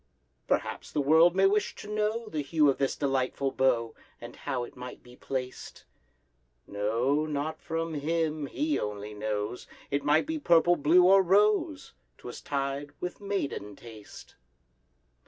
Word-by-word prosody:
Perhaps - - -2
the - - -1
world 160 +5 +5
may 195 0 +4
wish 205 +2 +1
to - - -10
know 215 +2 -1
The 155 -8 -3
hue 150 +1 +2
of - - -6
this 135 -1 0
delightful 135 -1 -1
bow, 120 -4 +1 0.3
And - - -10
how 125 -2 -3
it 120 - -10
might 125 0 -9
be 125 0 -15
placed: 130 -1 -6 0.8
No, 115 +9 0
not 155 +1 -3
from 165 -1 -3
him, 155 0 -1
he 300 - -1
only 105 0 -5
knows— 105 +2 -4 0.2
It 140 0 0
might 150 - +3
be 320 +1 -3
purple, 175 - +4
blue, 170 +4 +4
or 195 +2 +7
rose,— 200 - +2 0.2
'Twas - - -9
tied—with 145 +6 -4
maiden 145 - -3
taste. 110 -2 -13
145 Hz, 145 wpm, -28 LUFS, 125-175 Hz, 0.8 s, or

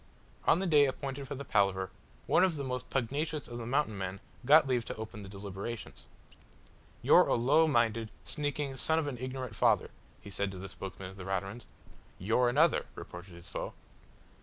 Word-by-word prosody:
On - - +6
the 190 - -1
day 150 -5 +6
appointed 135 0 -4
for 140 - -4
the 140 +1 -6
palaver, 95 -4 +1 0.3
one - - +4
of 185 -3 +3
the 140 - -3
most 125 -2 -4
pugnacious 140 +4 -1
of 120 0 -6
the 115 - -5
Mountain 135 -4 +1
men 95 0 -4 0.3
got 155 +2 +8
leave 125 -3 +1
to - - -5
open 110 -1 -7
the 100 - -9
deliberations. 100 +3 -7 1.0
"You're - - +7
a - - +3
low 145 +7 +4
minded, 115 -5 +2 0.2
sneaking 145 -2 -2
son 160 +4 +1
of 160 - +1
an 135 -4 -4
ignorant 130 -2 -4
father," - - +3 0.3
he 100 - -11
said 100 0 -1
to - - -7
the 95 +1 -6
spokesman 95 -1 -7
of 95 - -14
the 95 - -7
Raturans. 95 +4 -3 0.5
"You're 115 +6 +2
another," 155 +7 +3
retorted 90 0 -9
his 85 - -11
foe. - - -5
120 Hz, 185 wpm, -31 LUFS, 100-140 Hz, 1.0 s, got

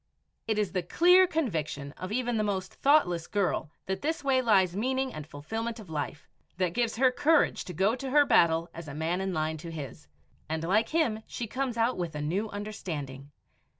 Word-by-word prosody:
It 220 -1 0
is 210 -3 0
the 185 - 0
clear 360 - +5
conviction 155 - -2
of 185 +6 -7
even 245 0 0
the 215 - +1
most 195 -3 -2
thoughtless 270 - +3
girl 200 -6 0 0.2
that 190 0 -3
this 320 +1 -2
way 265 -2 +3
lies 190 -7 +3
meaning 260 +4 -1
and 155 -1 -7
fulfillment 225 +11 -5
of 195 -7 -11
life, 150 -1 -4 0.3
that 180 -2 0
gives 235 0 0
her 255 +2 +4
courage 305 +4 +2
to 180 - -7
go 195 +6 +3
to 265 +1 -5
her 290 +2 +5
battle 165 -7 +4
as 165 -1 -8
a 140 - -7
man 165 +4 -1
in 190 0 -1
line 160 -1 -1
to 165 +2 -8
his, 145 - -8 0.4
and 160 0 -2
like 210 +6 +2
him 260 -10 +1
she 240 - -4
comes 255 +1 -3
out 230 -1 +1
with 170 -3 -3
a 150 - -3
new 195 +8 -1
understanding. 155 -10 -6
200 Hz, 200 wpm, -29 LUFS, 160-245 Hz, 0.4 s, clear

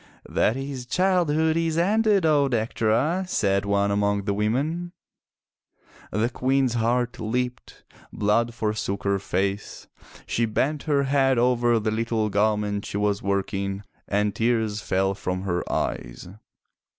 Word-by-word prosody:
"That 110 - +1
his 135 -2 -5
childhood 160 -2 +2
is 165 -1 0
ended, 205 +1 +3
O 145 -3 +4
Dectera," 120 +8 +1
said 100 - +1
one 100 0 +1
among 100 0 +1
the 100 0 -1
women. 145 - -1 1.2
The 110 +4 +1
Queen's 130 0 +1
heart 120 +1 0
leaped, 125 +3 -3 0.3
blood 115 +3 +1
forsook 105 -3 -2
her 100 -1 +1
face, 100 +2 -3 0.4
she 115 0 0
bent 140 +7 0
her 140 -1 +3
head 135 -1 +2
over 120 -1 +3
the 110 0 -1
little 110 -1 -1
garment 105 0 +1
she - - -4
was 105 -1 0
working 100 0 -2 0.2
and 105 0 0
tears 110 -2 0
fell 95 0 0
from 90 -1 -4
her 90 -2 -1
eyes. - - -3
115 Hz, 130 wpm, -24 LUFS, 100-135 Hz, 1.2 s, O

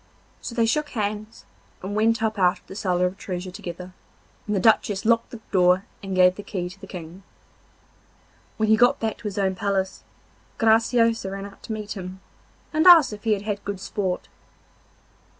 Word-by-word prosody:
So 235 - -6
they 230 - +3
shook 295 +6 0
hands 215 -1 -4 0.4
and 200 +2 -4
went 225 +1 +2
up 220 -2 -1
out 180 -1 +3
of - - -25
the - - -10
cellar 180 -3 0
of 180 +2 -3
treasure 180 -1 -5
together, 180 -2 -8 0.5
and 210 - 0
the - - +2
Duchess 210 -1 +2
locked 230 0 +2
the 235 - -10
door 185 0 +3 0.2
and 195 -1 -4
gave 180 0 +6
the 205 - -8
key 185 -3 -4
to 195 - -16
the - - -10
King. 175 0 -9 1.4
When 220 - +1
he 220 - +7
got 245 +2 +4
back 220 -1 -2
to - - -16
his 205 -1 -4
own 190 -1 +1
palace 190 0 -2 0.5
Graciosa 230 -1 +3
ran 195 0 -6
out 200 - -13
to - - -7
meet 215 -1 -6
him, 185 -1 -6 0.5
and 315 +3 +3
asked 330 -10 +8
if 210 +1 -10
he 220 - +3
had 200 -1 -3
had 205 -1 -3
good 200 -2 -4
sport. 190 -1 -3
205 Hz, 190 wpm, -24 LUFS, 185-220 Hz, 1.4 s, asked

